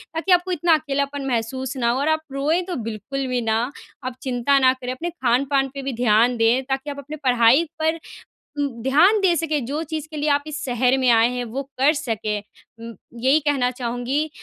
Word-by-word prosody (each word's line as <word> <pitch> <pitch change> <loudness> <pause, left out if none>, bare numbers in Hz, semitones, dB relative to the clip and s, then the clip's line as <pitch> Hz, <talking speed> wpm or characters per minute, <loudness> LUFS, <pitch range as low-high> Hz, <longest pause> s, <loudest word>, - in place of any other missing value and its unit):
ताकि 335 +4 -1
आपको 360 +1 +3
इतना 345 -1 +2
अकेलापन 280 -1 -3
महसूस 260 +2 -2
ना 235 -2 +1
हो। 255 - -1
और 295 +3 +1
आप 315 0 +1
रोएँ 300 +6 +1
तो - - -2
बिल्कुल 260 +6 -4
भी 250 -1 -1
ना, 225 0 +1 0.4
आप 255 -1 -4
चिंता 260 +2 +2
ना 260 -1 +5
करें, 255 -1 -6
अपने 335 +7 -4
खान-पान 270 -1 +1
पे 275 - -4
भी 270 0 -3
ध्यान 235 +1 +3
दें 230 +3 +3
ताकि 270 +2 -3
आप 280 - -6
अपनी 295 +3 -7
पढ़ाई 245 +3 +5 0.2
पर 320 +1 +1 0.6
उ 285 - +1 0.2
ध्यान 320 - +4
दे 355 -3 +3
सकें। 310 -3 -1
जो 290 +5 -3
चीज़ 310 -1 -3
के 310 - -6
लिए 300 +1 0
आप 285 0 +2
इस 305 0 -5
शहर 250 +1 +2
में 255 -2 +2
आए 230 0 +5
हैं, 250 0 -3
वो 255 +5 -4 0.2
कर 280 +4 +5
सकें 225 -8 -2 0.4
उ 230 0 -8 0.3
यही 275 +4 +5
कहना 275 -4 +1
चाहूँगी। 250 +5 -2
270 Hz, 210 wpm, -22 LUFS, 245-300 Hz, 0.6 s, ना